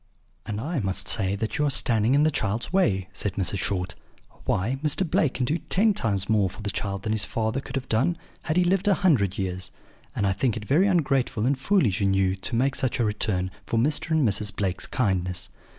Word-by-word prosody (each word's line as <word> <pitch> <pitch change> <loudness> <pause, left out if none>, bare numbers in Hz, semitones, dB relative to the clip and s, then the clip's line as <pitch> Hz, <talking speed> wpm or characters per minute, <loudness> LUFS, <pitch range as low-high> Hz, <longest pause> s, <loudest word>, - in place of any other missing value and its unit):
"'And 105 -2 -3
I 150 +6 -2
must 95 -2 -2
say 100 -2 +2
that 110 +9 -3
you 150 - +2
are - - +2
standing 115 -2 +4
in 145 - +4
the 155 - +3
child's 110 - -2
way,' 95 - +2
said 100 -2 -3
Mrs. 100 0 0
Short. 90 -1 -1 0.5
'Why, 120 +8 0
Mr. 155 +4 +2
Blake 150 -3 +1
can 125 - 0
do 155 +7 -1
ten 210 +3 +2
times 100 - -1
more 105 -3 +2
for 105 +4 -11
the 105 - -2
child 100 +1 -4
than 110 - -2
his 110 -2 0
father 110 +5 -2
could 135 - -8
have 130 -1 -3
done, 130 +11 +1 0.3
had 160 +1 0
he 180 - +5
lived 190 +3 +1
a 200 - +5
hundred 125 - +2
years; 95 -1 -4 0.4
and 100 - 0
I 100 - +2
think 115 +4 0
it 105 - -7
very 160 - +3
ungrateful 135 - +1
and 140 +3 +2
foolish 135 - +1
in 100 -1 +2
you 95 -1 +2
to 95 - -4
make 135 +3 +2
such 130 -2 -1
a 120 - +2
return 95 -3 -1 0.2
for 115 - -1
Mr. 150 +7 +2
and 160 -5 +3
Mrs. 100 -1 0
Blake's 95 -3 -2
kindness.' 90 -6 -1
110 Hz, 225 wpm, -25 LUFS, 100-145 Hz, 0.5 s, he